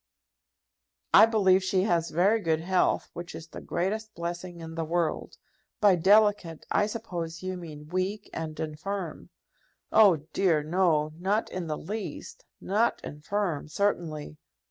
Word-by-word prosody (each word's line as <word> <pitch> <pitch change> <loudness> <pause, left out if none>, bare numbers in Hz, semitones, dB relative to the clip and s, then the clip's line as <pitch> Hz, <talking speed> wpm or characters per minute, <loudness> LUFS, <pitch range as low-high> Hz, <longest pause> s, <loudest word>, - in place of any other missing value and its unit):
"I - - +9
believe 190 -4 +3
she 185 0 +1
has 170 -4 +1
very 195 +7 +3
good 160 -3 0
health, 180 +1 +1
which 175 +1 -7
is 160 - -9
the - - -9
greatest 215 +4 -3
blessing 175 +1 -5
in 165 0 -8
the 165 0 -2
world. 165 +1 -2 0.4
By 205 -5 +5
delicate 195 -3 +3
I 205 - +3
suppose 175 -7 -5
you 185 0 -3
mean 155 -4 -9
weak 185 +4 -2
and 160 -1 -5
infirm." 160 +3 -5 0.6
"Oh, 210 -5 +7 0.2
dear, 170 -6 +2
no, 155 -2 +2
not 200 +5 0
in 185 -2 -4
the 155 -1 -2
least, 205 +2 -7
not 215 +5 +1
infirm 160 +1 -3
certainly! 155 - -2
180 Hz, 140 wpm, -28 LUFS, 160-200 Hz, 0.6 s, I